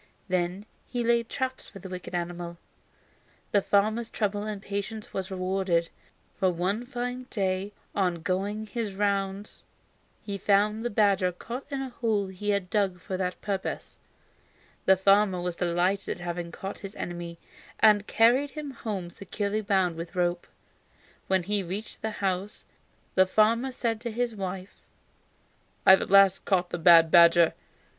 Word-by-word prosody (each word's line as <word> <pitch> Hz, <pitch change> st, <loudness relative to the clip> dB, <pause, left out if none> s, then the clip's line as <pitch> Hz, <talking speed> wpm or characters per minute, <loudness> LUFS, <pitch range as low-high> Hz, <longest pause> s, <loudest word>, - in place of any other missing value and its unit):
Then 180 Hz, +2 st, -1 dB, 0.2 s
he 245 Hz, -1 st, -2 dB
laid 235 Hz, 0 st, +2 dB
traps 260 Hz, -1 st, -3 dB
for -, -, -12 dB
the 195 Hz, -, -9 dB
wicked 180 Hz, -1 st, -7 dB
animal. 175 Hz, 0 st, -4 dB, 0.9 s
The 205 Hz, -, +4 dB
farmer's 215 Hz, +4 st, +1 dB
trouble 205 Hz, -1 st, -2 dB
and 215 Hz, -2 st, -4 dB
patience 205 Hz, +2 st, -5 dB
was 190 Hz, 0 st, -3 dB
rewarded, 185 Hz, -2 st, 0 dB, 0.5 s
for 190 Hz, -2 st, +3 dB
one 190 Hz, +7 st, -1 dB
fine 250 Hz, 0 st, -4 dB
day 195 Hz, -1 st, -1 dB, 0.2 s
on 180 Hz, -4 st, 0 dB
going 200 Hz, +5 st, -1 dB
his 215 Hz, -2 st, -4 dB
rounds 200 Hz, 0 st, -2 dB, 0.6 s
he 200 Hz, -2 st, -5 dB
found 210 Hz, +3 st, +2 dB
the 240 Hz, -, -1 dB
badger 200 Hz, -4 st, +2 dB
caught 240 Hz, +10 st, -7 dB
in 275 Hz, -2 st, -3 dB
a 265 Hz, -, -5 dB
hole 220 Hz, -5 st, -1 dB
he 190 Hz, +2 st, -5 dB
had 200 Hz, -3 st, 0 dB
dug 195 Hz, -4 st, +1 dB
for 185 Hz, +1 st, -5 dB
that 185 Hz, -1 st, -2 dB
purpose. 195 Hz, -2 st, -4 dB, 0.9 s
The 190 Hz, 0 st, +6 dB
farmer 195 Hz, 0 st, +4 dB
was 175 Hz, -1 st, -3 dB
delighted 180 Hz, +3 st, 0 dB
at -, -, -8 dB
having 175 Hz, -1 st, -4 dB
caught 195 Hz, +4 st, -7 dB
his 195 Hz, 0 st, -9 dB
enemy, 175 Hz, -1 st, -6 dB, 0.4 s
and 210 Hz, -2 st, +5 dB
carried 245 Hz, +5 st, +4 dB
him 290 Hz, +1 st, -6 dB
home 200 Hz, -8 st, -5 dB
securely 200 Hz, +3 st, -3 dB
bound 190 Hz, -5 st, +1 dB
with 170 Hz, +1 st, -7 dB
rope. 175 Hz, -1 st, 0 dB, 0.8 s
When 190 Hz, -1 st, +2 dB
he 205 Hz, +2 st, 0 dB
reached 195 Hz, +4 st, -6 dB
the 220 Hz, -, -1 dB, 0.2 s
house 190 Hz, +2 st, -2 dB, 0.5 s
the 185 Hz, 0 st, +4 dB
farmer 230 Hz, +6 st, +3 dB
said 230 Hz, -3 st, -2 dB
to 235 Hz, -1 st, -4 dB
his 235 Hz, 0 st, -2 dB
wife: 190 Hz, -1 st, -6 dB, 1.1 s
"I -, -, +9 dB
have 190 Hz, -, +7 dB
at -, -, -4 dB
last 195 Hz, -1 st, +6 dB
caught 180 Hz, -3 st, +1 dB
the 175 Hz, -, -3 dB
bad 165 Hz, -1 st, +7 dB
badger. 170 Hz, -1 st, +7 dB
195 Hz, 155 wpm, -27 LUFS, 180-215 Hz, 1.1 s, I